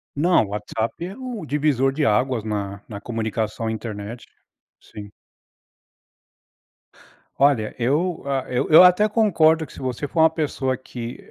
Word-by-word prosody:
Não, 170 Hz, +1 st, +3 dB
o -, -, -10 dB
WhatsApp 105 Hz, +2 st, -3 dB
é 190 Hz, +5 st, -8 dB
um 250 Hz, -6 st, -6 dB
divisor 145 Hz, -3 st, +1 dB
de 150 Hz, +2 st, -1 dB
águas 125 Hz, +1 st, +1 dB
na 100 Hz, -2 st, -4 dB
na 100 Hz, -2 st, -8 dB
comunicação 110 Hz, -1 st, -3 dB
internet. 110 Hz, +1 st, -6 dB, 0.6 s
Sim. 105 Hz, -1 st, -12 dB, 2.3 s
Olha, 135 Hz, -6 st, +2 dB
eu, 155 Hz, +8 st, 0 dB
ah, 135 Hz, -2 st, -1 dB
eu 125 Hz, -, -1 dB
eu 160 Hz, +3 st, +9 dB
até 180 Hz, +4 st, +5 dB
concordo 165 Hz, -8 st, +3 dB
que -, -, -16 dB
se -, -, -11 dB
você 130 Hz, +1 st, -3 dB
for 160 Hz, -, -3 dB
uma 160 Hz, 0 st, +6 dB
pessoa 140 Hz, -5 st, -2 dB
que 120 Hz, -2 st, -8 dB
130 Hz, 145 wpm, -22 LUFS, 110-160 Hz, 2.3 s, eu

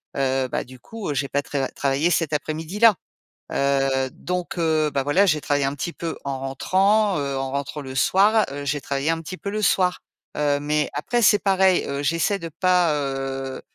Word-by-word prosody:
Heu, 135 Hz, -1 st, 0 dB
bah -, -, -2 dB
du 130 Hz, 0 st, -14 dB
coup, 210 Hz, -, -6 dB
j'ai 140 Hz, 0 st, -1 dB
pas 145 Hz, +1 st, -1 dB
tra 135 Hz, -2 st, -2 dB
travaillé 140 Hz, +4 st, 0 dB
cet 165 Hz, -3 st, +1 dB
après-midi-là. 160 Hz, +9 st, +2 dB, 0.6 s
Heu, 135 Hz, -1 st, +1 dB
donc, 180 Hz, +2 st, -4 dB
heu, 155 Hz, -2 st, +1 dB
bah, 140 Hz, -, +1 dB
voilà, 145 Hz, +9 st, +3 dB
j'ai 155 Hz, -5 st, +2 dB
travaillé 145 Hz, -1 st, 0 dB
un 135 Hz, -, -2 dB
petit 145 Hz, +4 st, -4 dB
peu 165 Hz, -1 st, -5 dB
en 135 Hz, -1 st, -3 dB
rentrant, 190 Hz, +9 st, +2 dB
heu, 140 Hz, -1 st, -2 dB
en 135 Hz, 0 st, -3 dB
rentrant, 140 Hz, +2 st, -4 dB
le 130 Hz, -1 st, -8 dB
soir, 205 Hz, -, +4 dB
heu, 145 Hz, +1 st, -6 dB
j'ai 145 Hz, +1 st, -1 dB
travaillé 140 Hz, +3 st, -1 dB
un 165 Hz, 0 st, -1 dB
petit 170 Hz, +3 st, -7 dB
peu 200 Hz, -, -5 dB
le 215 Hz, +1 st, -2 dB
soir. 180 Hz, -2 st, +2 dB, 0.4 s
Heu, 145 Hz, -1 st, +1 dB
mais 150 Hz, +1 st, 0 dB
après, 240 Hz, -, -1 dB
c'est 205 Hz, -1 st, +5 dB
pareil, 190 Hz, -2 st, +3 dB
heu, 140 Hz, 0 st, -3 dB
j'essaie 165 Hz, +7 st, +1 dB
de 165 Hz, -, -6 dB
pas, 180 Hz, -4 st, +3 dB
heu, 135 Hz, -1 st, -3 dB
150 Hz, 195 wpm, -23 LUFS, 140-185 Hz, 0.6 s, c'est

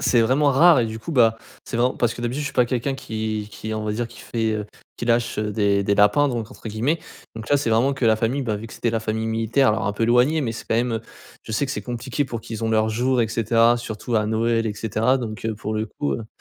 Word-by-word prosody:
c'est 120 Hz, -, +3 dB
vraiment 135 Hz, +6 st, +3 dB
rare 155 Hz, +1 st, +6 dB
et -, -, +1 dB
du 110 Hz, 0 st, -6 dB
coup, 165 Hz, +8 st, -6 dB
bah, 115 Hz, -4 st, +4 dB, 0.3 s
c'est 115 Hz, -, -4 dB
vraiment 125 Hz, +2 st, +2 dB
parce 120 Hz, -2 st, +1 dB
que -, -, -9 dB
d'habitude 120 Hz, +4 st, -2 dB
je -, -, -3 dB
suis -, -, -9 dB
pas 125 Hz, -2 st, +3 dB
quelqu'un 125 Hz, +3 st, -1 dB
qui 110 Hz, -4 st, -4 dB
qui, 110 Hz, +1 st, -6 dB
on 110 Hz, -, -3 dB
va 105 Hz, 0 st, -2 dB
dire, 120 Hz, +2 st, -2 dB
qui 115 Hz, -, -14 dB
fait, 115 Hz, -2 st, -1 dB
heu, 105 Hz, -1 st, -3 dB, 0.3 s
qui 120 Hz, -, -4 dB
lâche, 115 Hz, -1 st, +1 dB
heu, 105 Hz, 0 st, -1 dB
des 100 Hz, -1 st, +2 dB
«des 100 Hz, +1 st, +1 dB
lapins» 105 Hz, +8 st, +4 dB
donc 115 Hz, -4 st, -3 dB
entre 110 Hz, -, -9 dB
guillemets 125 Hz, +10 st, 0 dB, 0.4 s
donc 110 Hz, +1 st, -8 dB
là, 145 Hz, -, +4 dB
c'est 135 Hz, -5 st, -1 dB
vraiment 120 Hz, +5 st, +3 dB
que 130 Hz, -2 st, -2 dB
la 110 Hz, -1 st, +4 dB
famille, 120 Hz, +5 st, 0 dB
ben, 110 Hz, -4 st, -1 dB
vu 110 Hz, +2 st, -7 dB
que -, -, -13 dB
c'était 115 Hz, -, -1 dB
la 115 Hz, 0 st, -1 dB
famille 110 Hz, 0 st, -2 dB
militaire 115 Hz, +4 st, +2 dB
alors 110 Hz, 0 st, 0 dB
un 105 Hz, -, 0 dB
peu 110 Hz, -, -3 dB
éloignée 125 Hz, +7 st, +3 dB
mais 115 Hz, -, -2 dB
c'est 115 Hz, -, -8 dB
quand -, -, +1 dB
même, 120 Hz, +1 st, +1 dB
heu, 110 Hz, -, -2 dB, 0.4 s
je -, -, -8 dB
sais 110 Hz, -, +1 dB
que 135 Hz, -, -3 dB
c'est -, -, -3 dB
compliqué 125 Hz, +3 st, -3 dB
pour 115 Hz, -3 st, -5 dB
qu'ils 115 Hz, 0 st, -6 dB
ont 110 Hz, -, 0 dB
leurs 110 Hz, 0 st, +2 dB
jours 125 Hz, +2 st, +1 dB
et 110 Hz, -, -1 dB
cetera, 115 Hz, +2 st, +3 dB
surtout 115 Hz, 0 st, -5 dB
à 105 Hz, -1 st, +2 dB
Noël 115 Hz, +1 st, +1 dB
et 105 Hz, -, -2 dB
cetera 110 Hz, +4 st, +1 dB
donc 110 Hz, -4 st, -5 dB
heu, 110 Hz, -, -1 dB
pour 110 Hz, +1 st, -5 dB
le 110 Hz, +1 st, -1 dB
coup, 145 Hz, +6 st, -3 dB
heu, 115 Hz, -, -4 dB
115 Hz, 290 wpm, -23 LUFS, 110-125 Hz, 0.4 s, rare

